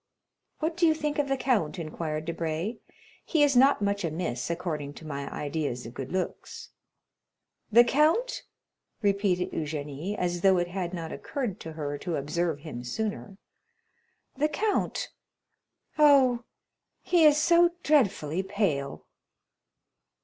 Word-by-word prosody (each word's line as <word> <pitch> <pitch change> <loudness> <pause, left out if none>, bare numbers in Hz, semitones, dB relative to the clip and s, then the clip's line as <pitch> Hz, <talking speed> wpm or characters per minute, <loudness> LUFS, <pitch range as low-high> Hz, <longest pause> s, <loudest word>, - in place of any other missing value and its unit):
"What 320 +1 -1
do 345 -1 +3
you 315 - +4
think 300 -1 -2
of 290 - +1
the 270 0 0
count?" 235 - 0
inquired 155 -1 -4
Debray; 165 +6 -3 0.5
"he 310 -4 +2
is 285 -2 +3
not 265 -3 +5
much 200 0 0
amiss, 160 -6 -3
according 155 -4 -3
to 160 - -11
my 140 -2 -5
ideas 145 -4 -3
of 115 - -8
good 135 +1 -6
looks." 185 0 -4 1.0
"The 235 +3 +8
count," 315 - +2 0.6
repeated 200 -3 +1
Eugénie, 150 +5 -4
as 175 -1 -1
though 190 -1 +5
it 175 0 0
had 180 -1 -3
not 165 -2 -5
occurred 245 -9 -4
to 160 - -8
her 145 -2 -4
to 175 -3 -3
observe 155 +1 -1
him 130 -6 -7
sooner; 205 - -4 1.0
"the 300 +3 +1
count?—oh, 285 - 0 0.6
he 345 -2 +3
is 300 -1 +7
so 340 +2 +5
dreadfully 190 - +2
pale." 190 -9 -2
185 Hz, 130 wpm, -28 LUFS, -, 1.0 s, The